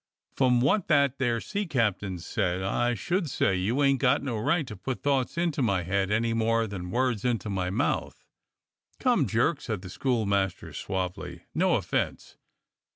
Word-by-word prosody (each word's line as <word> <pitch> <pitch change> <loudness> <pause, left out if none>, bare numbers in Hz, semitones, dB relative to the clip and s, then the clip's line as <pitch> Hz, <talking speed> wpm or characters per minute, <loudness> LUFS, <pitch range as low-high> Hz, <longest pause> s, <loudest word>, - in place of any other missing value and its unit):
"From 125 -2 +3
what 170 - +2
that 140 -4 +3
there 120 -3 +1
sea 205 - -3
captain 105 - 0
said, 90 +1 -2
I 120 +5 +1
should 175 - -1
say 95 - +1
you 110 +10 0
ain't 135 -1 +3
got 135 +2 +3
no 130 -5 -2
right 150 +7 +1
to 110 - -8
put 125 +7 -5
thoughts 140 0 0
into 170 -4 0
my 100 -7 +1
head 95 +2 0
any 115 +2 +1
more 115 0 +2
than 95 -4 -6
words 120 -1 0
into 115 -4 -1
my 90 -2 -1
mouth." 115 +10 -2 0.7
"Come, 240 - +2
Jerk," 120 +7 +1
said 110 -5 -4
the 90 - -8
schoolmaster 100 -7 -1
suavely, 90 -2 -4
"no 180 +1 +3
offence." 95 -6 -2
115 Hz, 165 wpm, -27 LUFS, 100-140 Hz, 0.7 s, From